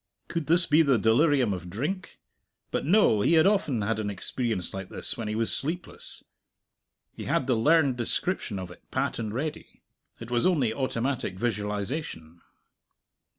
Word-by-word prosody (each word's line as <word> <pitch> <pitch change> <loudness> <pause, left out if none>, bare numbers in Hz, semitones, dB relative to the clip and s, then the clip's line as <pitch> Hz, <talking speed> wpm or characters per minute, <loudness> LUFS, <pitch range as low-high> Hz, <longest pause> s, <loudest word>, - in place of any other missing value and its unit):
Could 165 -4 -3
this 170 +2 +5
be 155 +2 +5
the 140 -5 +4
delirium 120 +1 +3
of 90 -1 -6
drink? 155 - -4 0.5
But - - -2
no; 170 - +4
he 160 - +3
had 160 0 +6
often 160 - +2
had 110 +1 -1
an 105 -1 -2
experience 100 -1 -2
like 95 -1 -6
this - - -2
when 115 -4 -5
he 105 - -2
was 115 0 0
sleepless; 170 +5 -5 0.9
he - - -7
had - - +1
the 130 - +2
learned 140 +2 +3
description 120 - -1
of 90 -2 -6
it - - -14
pat 130 0 -1
and 110 -2 -3
ready; 145 +7 -5 0.4
it 115 +1 -9
was 120 +4 +2
only 140 -11 +2
automatic 130 -5 -2
visualization. 105 - -3
120 Hz, 160 wpm, -27 LUFS, 105-150 Hz, 0.9 s, had